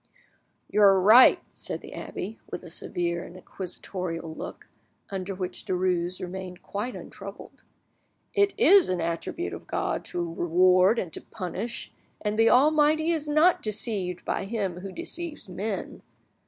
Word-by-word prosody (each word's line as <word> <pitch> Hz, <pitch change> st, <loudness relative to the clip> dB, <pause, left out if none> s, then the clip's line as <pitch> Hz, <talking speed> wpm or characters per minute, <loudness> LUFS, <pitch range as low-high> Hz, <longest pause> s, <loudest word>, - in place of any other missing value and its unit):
'" -, -, -34 dB
"You 210 Hz, -, +3 dB
are 195 Hz, -2 st, +7 dB
right," 220 Hz, +7 st, +8 dB
said -, -, -5 dB
the -, -, -11 dB
abbe, 215 Hz, +5 st, -6 dB
with -, -, -6 dB
a 175 Hz, -, -10 dB
severe 170 Hz, 0 st, -2 dB
and 175 Hz, -, -11 dB
inquisitorial 180 Hz, -3 st, -6 dB
look, -, -, -8 dB, 0.4 s
under 195 Hz, 0 st, -4 dB
which 185 Hz, -1 st, -4 dB
Derues 180 Hz, -1 st, 0 dB
remained 185 Hz, 0 st, -7 dB
quite 215 Hz, +5 st, -4 dB
untroubled; 200 Hz, -1 st, -10 dB, 0.7 s
"it 405 Hz, 0 st, +2 dB
is 395 Hz, -, +6 dB
an 185 Hz, -1 st, 0 dB
attribute 170 Hz, -, -3 dB
of -, -, -9 dB
God -, -, -2 dB
to 175 Hz, -1 st, -2 dB
reward 185 Hz, +5 st, +4 dB
and 175 Hz, -7 st, -3 dB
to -, -, -6 dB
punish, 205 Hz, +5 st, -5 dB, 0.3 s
and 210 Hz, +1 st, -2 dB
the 225 Hz, -, +6 dB
Almighty 310 Hz, +4 st, +4 dB
is 310 Hz, -2 st, -2 dB
not 310 Hz, +4 st, +4 dB
deceived 205 Hz, -4 st, -1 dB
by -, -, -1 dB
him 195 Hz, -4 st, -2 dB
who 195 Hz, +1 st, -7 dB
deceives 340 Hz, -, -4 dB
men. 195 Hz, +3 st, -4 dB
195 Hz, 150 wpm, -27 LUFS, 180-235 Hz, 0.7 s, right